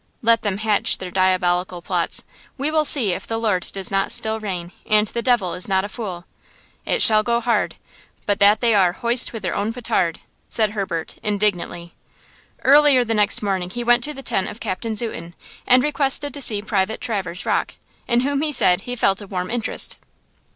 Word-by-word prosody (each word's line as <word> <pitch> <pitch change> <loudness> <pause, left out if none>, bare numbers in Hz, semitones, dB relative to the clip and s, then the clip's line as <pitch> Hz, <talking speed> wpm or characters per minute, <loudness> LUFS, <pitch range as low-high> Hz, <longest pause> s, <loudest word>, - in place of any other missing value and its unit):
Let 230 0 +3
them 200 -3 -2
hatch 215 -1 0
their 185 -1 -7
diabolical 180 -1 0
plots. - - 0 0.3
We 280 +3 -2
will 310 -1 +1
see 250 -9 +3
if - - -5
the 225 - -2
Lord 210 -6 -1
does 195 0 -2
not 195 0 0
still 220 0 0
reign, 180 -5 -5
and 215 0 +2
the 235 +3 -4
devil 235 -8 +1
is 180 - +1
not 190 -1 +1
a - - -7
fool. 190 -7 -7 0.6
It - - +3
shall 215 -1 +7
go 235 +2 0
hard, 230 -3 -1 0.5
but 205 -1 0
that 205 +1 +4
they 235 -2 +3
are 185 -4 +3
'hoist 240 +3 +2
with 225 -4 -8
their 185 - -2
own 205 +2 -2
petard!' 225 -8 -1 0.3
said 215 -2 +2
Herbert, 190 -6 -4
indignantly. 200 -5 -2 0.7
Early 280 -2 +5
the 225 -1 -2
next 210 0 +2
morning 190 -3 -2
he 240 +6 -5
went 240 0 +3
to 300 - -5
the 270 - -10
tent 190 - 0
of 215 - -9
Captain 220 +2 -4
Zuten 175 -7 -3 0.3
and 250 0 +5
requested 290 -1 +1
to 285 - -3
see 210 -5 +3
Private 210 0 -1
Traverse 190 -5 -4
Rocke, - - -1 0.3
in 235 0 +2
whom, 280 +2 -1
he 310 -1 -1
said, 180 -9 +3
he 245 +3 -5
felt 195 -3 +1
a 205 - -10
warm 185 0 -4
interest. 240 -2 0
210 Hz, 195 wpm, -21 LUFS, 190-240 Hz, 0.7 s, shall